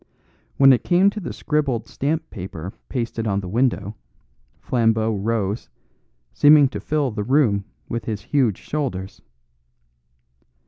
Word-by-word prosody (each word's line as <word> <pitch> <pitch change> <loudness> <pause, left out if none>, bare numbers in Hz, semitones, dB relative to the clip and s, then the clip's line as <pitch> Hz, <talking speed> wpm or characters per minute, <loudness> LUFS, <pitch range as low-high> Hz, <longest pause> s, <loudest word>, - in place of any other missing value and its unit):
When 135 -1 +7
it 125 - 0
came 185 +3 +4
to 215 - -6
the 185 - -5
scribbled 140 -7 -1
stamp 155 +4 -2
paper 90 -2 -7 0.2
pasted 115 -3 -3
on 100 -1 0
the 95 - -7
window, 110 -1 0 0.6
Flambeau 115 -2 +1
rose, 105 0 -2 0.6
seeming 145 -2 +6
to - - -6
fill 145 -4 -1
the 105 -1 -3
room 115 -5 +2 0.2
with 115 - -4
his 105 -3 -3
huge 125 -7 +1
shoulders. 120 -11 -4
115 Hz, 130 wpm, -22 LUFS, 105-145 Hz, 0.6 s, When